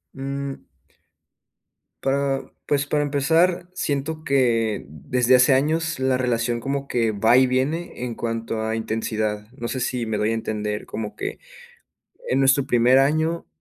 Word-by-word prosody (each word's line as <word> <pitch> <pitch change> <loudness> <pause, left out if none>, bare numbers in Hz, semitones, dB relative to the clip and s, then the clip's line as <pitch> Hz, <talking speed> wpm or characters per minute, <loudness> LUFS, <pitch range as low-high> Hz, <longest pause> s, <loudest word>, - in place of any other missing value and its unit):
Mm. 140 0 -5 1.4
Pa 135 0 0 0.2
pues 140 -1 +1
para 150 0 0
empezar, 165 +5 +2
siento 155 0 -2
que, 115 -6 +1
desde 120 - +2
hace 130 +2 +5
años, 160 +2 +1
la 130 -1 +2
relación 120 -2 0
como 140 +2 -3
que 115 -2 +1
va 110 +4 +4
y 130 0 +5
viene 135 +3 -1
en 120 -2 -3
cuanto 115 -1 -3
a 110 0 -1
intensidad, 110 -1 -2
no 120 -3 -5
sé 130 - -3
si 125 -1 -1
me 110 -1 -2
doy 105 +2 +1
a - - +1
entender. 105 -2 -3
Como 105 -2 -5
que, - - -5 0.9
en 135 - +2
nuestro 135 0 +4
primer 120 +2 +4
año, 155 +4 +1
130 Hz, 150 wpm, -23 LUFS, 115-140 Hz, 1.4 s, hace